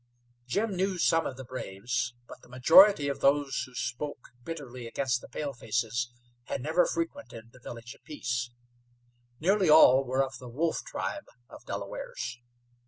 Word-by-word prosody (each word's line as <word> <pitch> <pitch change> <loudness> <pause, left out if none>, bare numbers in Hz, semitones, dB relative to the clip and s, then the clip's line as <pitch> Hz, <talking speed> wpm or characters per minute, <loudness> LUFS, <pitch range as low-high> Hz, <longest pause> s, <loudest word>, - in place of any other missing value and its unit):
Jim 205 - 0
knew 190 +1 0
some 165 -1 +2
of 130 - -6
the 130 - -7
braves, 120 0 -3
but - - -12
the - - -19
majority 150 +6 +7
of 140 - -2
those 140 -1 +2
who 130 - -17
spoke 125 +3 -4
bitterly 130 -7 -7
against 125 0 -1
the - - -11
palefaces 120 -3 -2 0.3
had 140 - -3
never 160 +7 +2
frequented 285 - -5
the 130 - -17
Village 120 0 -9
of - - -23
Peace. 120 -5 -3 0.9
Nearly 190 +1 +3
all 135 -4 +8
were 130 +1 +1
of 135 0 -6
the 125 - -9
Wolf 160 +7 -1
tribe 95 +2 -5 0.2
of - - -13
Delawares. - - -5
130 Hz, 155 wpm, -29 LUFS, 120-160 Hz, 0.9 s, all